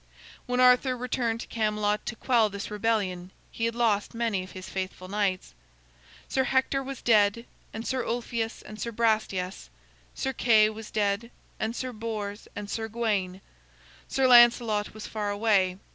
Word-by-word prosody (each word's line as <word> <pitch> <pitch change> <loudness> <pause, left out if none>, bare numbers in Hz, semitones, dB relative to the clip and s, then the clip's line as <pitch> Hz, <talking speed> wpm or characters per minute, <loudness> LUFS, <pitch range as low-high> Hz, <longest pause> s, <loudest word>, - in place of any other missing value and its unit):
When 250 0 0
Arthur 250 +1 +5
returned 240 -2 -1
to - - -8
Camelot 210 -1 -1
to 240 - -3
quell 230 -3 +2
this 200 +1 -6
rebellion, 205 -4 -1 0.2
he 230 - -2
had 230 0 -1
lost 225 -3 +1
many 230 -5 0
of 185 - -12
his 185 -1 -8
faithful 185 -1 -5
knights. 195 -2 -1 0.7
Sir 265 -1 +1
Hector 265 +1 +1
was 270 -1 -7
dead, 215 0 +3 0.3
and 225 +2 -6
Sir 260 -2 -1
Ulfius 230 -1 -3
and 215 0 -10
Sir 235 - -3
Brastias; 215 - -1 0.5
Sir 265 - -2
Kay 220 -3 +4
was 220 0 -9
dead, 205 +2 0 0.3
and 220 +2 -2
Sir 255 0 -4
Bors, 215 -2 -5
and 205 0 -5
Sir 220 +2 -3
Gawain. 205 -5 -1 0.7
Sir 270 - +1
Lancelot 235 -4 +5
was 215 - -7
far 210 -2 -3
away. 205 -3 +2
220 Hz, 160 wpm, -27 LUFS, 205-235 Hz, 0.7 s, Arthur